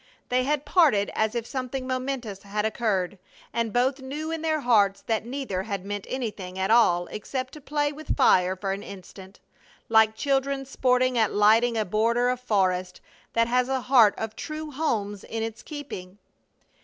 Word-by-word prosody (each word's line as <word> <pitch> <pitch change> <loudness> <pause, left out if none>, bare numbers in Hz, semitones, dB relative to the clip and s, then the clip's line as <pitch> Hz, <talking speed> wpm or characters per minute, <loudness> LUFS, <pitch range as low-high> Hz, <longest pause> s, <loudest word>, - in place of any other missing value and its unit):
They 255 0 +2
had 295 0 0
parted 280 - +3
as 220 +2 0
if 235 -1 -2
something 255 +1 -4
momentous 255 -6 -3
had 210 +1 -2
occurred, 205 -4 -1 0.3
and 230 -2 -1
both 255 +4 +1
knew 300 +4 -5
in 325 -1 -3
their 315 -1 0
hearts 205 -6 +3
that 225 0 -1
neither 250 -8 -3
had 195 -2 -5
meant 205 0 -5
anything 210 -8 -4
at 190 +2 0
all 175 -7 +4
except 255 +5 -4
to 300 - -10
play 290 +1 -1
with 305 +1 -4
fire 185 0 +4
for 195 +1 -3
an 195 +1 -3
instant, 190 0 -11 0.5
like 220 -1 +5
children 275 +1 0
sporting 255 -1 +1
at 220 -2 +1
lighting 225 +3 +4
a 215 - +1
border 230 +5 +2
of 250 0 -1
forest 185 -6 0 0.3
that 230 0 +3
has 250 +1 +1
a 265 -1 0
heart 240 -6 +5
of 220 0 -4
true 310 0 -6
homes 215 -9 -2
in 225 0 -4
its 225 0 -5
keeping. 205 - -8
230 Hz, 175 wpm, -26 LUFS, 205-265 Hz, 0.5 s, like